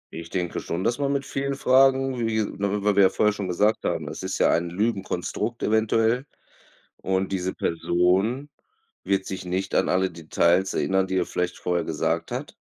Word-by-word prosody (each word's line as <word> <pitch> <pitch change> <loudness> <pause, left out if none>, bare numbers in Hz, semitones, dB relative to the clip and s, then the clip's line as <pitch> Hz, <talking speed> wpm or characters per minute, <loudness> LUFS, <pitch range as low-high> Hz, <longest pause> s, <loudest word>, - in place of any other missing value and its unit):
Ich 80 0 -7
denke 90 -2 -2
schon, 85 +3 -4
dass 120 +5 0
man 140 -1 0
mit 140 -1 -1
vielen 140 0 -2
Fragen, 135 -1 +3
wie 110 -1 +1
w 100 0 -2
w 105 -1 +3
wir 95 -1 +6
vorher 105 +1 +2
schon 100 -2 -4
gesagt 105 +5 +1
haben, 75 - -2
es 75 - -6
ist 95 0 -3
ja - - +4
ein 85 +1 +1
Lügenkonstrukt 105 +3 -2
eventuell 115 +4 +2 0.7
und 95 0 -1
diese 95 -1 -2
Person 95 - +1 0.6
wird 95 -1 +1
sich 95 -1 -6
nicht 95 +1 -3
an - - +3
alle 95 +1 +1
Details 85 +3 +1
erinnern, 95 0 +1
die 95 - -2
er 90 - +1
vielleicht 90 0 -2
vorher 90 -1 -1
gesagt 80 -2 -1
hat - - -6
95 Hz, 180 wpm, -25 LUFS, 90-115 Hz, 0.7 s, wir